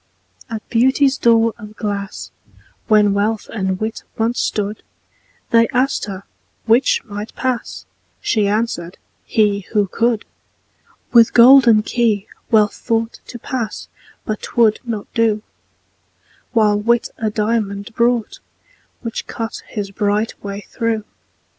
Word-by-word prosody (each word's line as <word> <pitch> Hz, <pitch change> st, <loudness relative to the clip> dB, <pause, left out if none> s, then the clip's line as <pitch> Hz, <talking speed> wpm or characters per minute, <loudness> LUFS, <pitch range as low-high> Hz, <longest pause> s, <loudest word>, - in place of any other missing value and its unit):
At 220 Hz, -2 st, -6 dB
Beauty's 265 Hz, +3 st, +3 dB
door 230 Hz, -2 st, +3 dB
of 210 Hz, -1 st, -11 dB
glass, 200 Hz, -2 st, -4 dB, 0.6 s
When 210 Hz, -2 st, +4 dB
Wealth 210 Hz, +2 st, -1 dB
and 190 Hz, -3 st, -2 dB
Wit 220 Hz, +1 st, -3 dB, 0.2 s
once 230 Hz, +2 st, 0 dB
stood, 210 Hz, 0 st, -2 dB, 0.7 s
They 230 Hz, 0 st, +5 dB
asked 260 Hz, +2 st, +1 dB
her 195 Hz, -2 st, -7 dB, 0.4 s
'which 230 Hz, +4 st, +3 dB
might 210 Hz, -1 st, -7 dB
pass?" 255 Hz, -2 st, -3 dB, 0.3 s
She 210 Hz, -3 st, +1 dB
answered, 200 Hz, -5 st, -2 dB, 0.3 s
"he, 210 Hz, -2 st, +2 dB
who 210 Hz, -2 st, +3 dB
could." 230 Hz, +3 st, 0 dB, 0.9 s
With 230 Hz, -2 st, +6 dB
golden 240 Hz, -3 st, +7 dB
key 220 Hz, -4 st, 0 dB, 0.2 s
Wealth 215 Hz, -2 st, +4 dB
thought 225 Hz, 0 st, -2 dB
To 240 Hz, -, -8 dB
pass 235 Hz, -2 st, -5 dB, 0.4 s
but 215 Hz, -, -3 dB
'twould 225 Hz, -3 st, +2 dB
not 225 Hz, -4 st, -4 dB
do: 220 Hz, -3 st, +1 dB, 1.1 s
While 210 Hz, -3 st, +3 dB
Wit 235 Hz, +3 st, +1 dB
a 220 Hz, -, 0 dB
diamond 210 Hz, -1 st, -2 dB
brought, 235 Hz, -1 st, 0 dB, 0.6 s
Which 230 Hz, -2 st, -5 dB
cut 225 Hz, -1 st, -5 dB
his 205 Hz, -3 st, -5 dB
bright 205 Hz, +2 st, 0 dB
way 200 Hz, 0 st, -5 dB
through. 230 Hz, -1 st, -2 dB
220 Hz, 120 wpm, -19 LUFS, 210-235 Hz, 1.1 s, golden